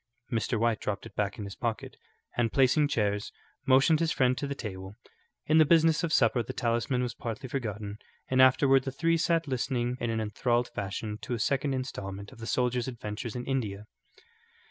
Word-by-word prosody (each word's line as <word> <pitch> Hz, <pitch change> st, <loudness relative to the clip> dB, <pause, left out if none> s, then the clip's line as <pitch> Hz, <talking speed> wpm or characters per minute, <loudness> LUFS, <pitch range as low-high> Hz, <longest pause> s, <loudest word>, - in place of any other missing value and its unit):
Mr. 115 Hz, 0 st, 0 dB
White 115 Hz, -1 st, +1 dB
dropped 105 Hz, -2 st, -3 dB
it -, -, -11 dB
back 100 Hz, -1 st, -1 dB
in 105 Hz, -, -5 dB
his 100 Hz, -1 st, -6 dB
pocket, 115 Hz, -3 st, -3 dB, 0.4 s
and 120 Hz, -2 st, +1 dB
placing 140 Hz, +2 st, +4 dB
chairs, 105 Hz, -6 st, -1 dB, 0.4 s
motioned 135 Hz, +4 st, +5 dB
his 165 Hz, -1 st, +1 dB
friend 130 Hz, -3 st, +2 dB
to 140 Hz, -, -3 dB
the 140 Hz, -, -3 dB
table. 95 Hz, -4 st, -7 dB, 0.5 s
In 155 Hz, +1 st, +4 dB
the -, -, +9 dB
business 160 Hz, +1 st, +4 dB
of 165 Hz, -, -1 dB
supper 120 Hz, -4 st, +3 dB
the 130 Hz, -, -6 dB
talisman 120 Hz, +1 st, 0 dB
was 120 Hz, -2 st, -3 dB
partly 115 Hz, +4 st, -5 dB
forgotten, 105 Hz, -5 st, -4 dB, 0.3 s
and 130 Hz, 0 st, +3 dB
afterward 135 Hz, +1 st, +5 dB
the 135 Hz, -, -3 dB
three 165 Hz, +5 st, +1 dB
sat 165 Hz, 0 st, +1 dB
listening 125 Hz, -2 st, -1 dB
in 120 Hz, -, -1 dB
an 115 Hz, 0 st, -1 dB
enthralled 120 Hz, +3 st, 0 dB
fashion 105 Hz, +2 st, -4 dB
to 125 Hz, -, -3 dB
a -, -, -5 dB
second 135 Hz, +4 st, 0 dB
instalment 100 Hz, -6 st, -5 dB
of 130 Hz, -, -15 dB
the 115 Hz, -, -7 dB
soldier's 125 Hz, -1 st, 0 dB
adventures 115 Hz, -1 st, -5 dB
in 125 Hz, -, -4 dB
India. 105 Hz, -7 st, -2 dB
125 Hz, 190 wpm, -29 LUFS, 110-135 Hz, 0.5 s, the